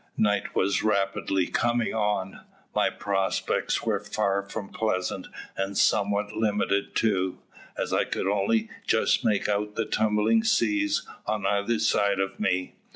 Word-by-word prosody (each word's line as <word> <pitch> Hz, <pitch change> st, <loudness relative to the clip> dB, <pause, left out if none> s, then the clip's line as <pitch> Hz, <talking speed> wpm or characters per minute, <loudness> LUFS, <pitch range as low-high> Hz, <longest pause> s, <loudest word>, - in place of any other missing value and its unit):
Night 105 Hz, -2 st, +1 dB
was 100 Hz, +1 st, +2 dB
rapidly 100 Hz, -2 st, +1 dB
coming 120 Hz, +3 st, 0 dB
on, 105 Hz, -3 st, -1 dB, 0.3 s
my -, -, +2 dB
prospects 95 Hz, -1 st, -1 dB
were 110 Hz, -3 st, 0 dB
far 100 Hz, -1 st, 0 dB
from 100 Hz, +1 st, -7 dB
pleasant, 95 Hz, -3 st, -2 dB, 0.3 s
and 95 Hz, +1 st, -2 dB
somewhat 100 Hz, +1 st, +2 dB
limited 105 Hz, -2 st, 0 dB
too, 95 Hz, -4 st, +1 dB, 0.4 s
as -, -, -2 dB
I -, -, +2 dB
could -, -, -3 dB
only 105 Hz, +3 st, +1 dB, 0.2 s
just -, -, +2 dB
make 105 Hz, -2 st, +1 dB
out 105 Hz, 0 st, -1 dB
the -, -, 0 dB
tumbling 110 Hz, -, +2 dB
seas 305 Hz, +7 st, +1 dB, 0.2 s
on 105 Hz, 0 st, -1 dB
either 100 Hz, +3 st, +1 dB
side 100 Hz, -2 st, +2 dB
of 95 Hz, 0 st, -2 dB
me. 90 Hz, 0 st, 0 dB
100 Hz, 140 wpm, -26 LUFS, 95-110 Hz, 0.4 s, was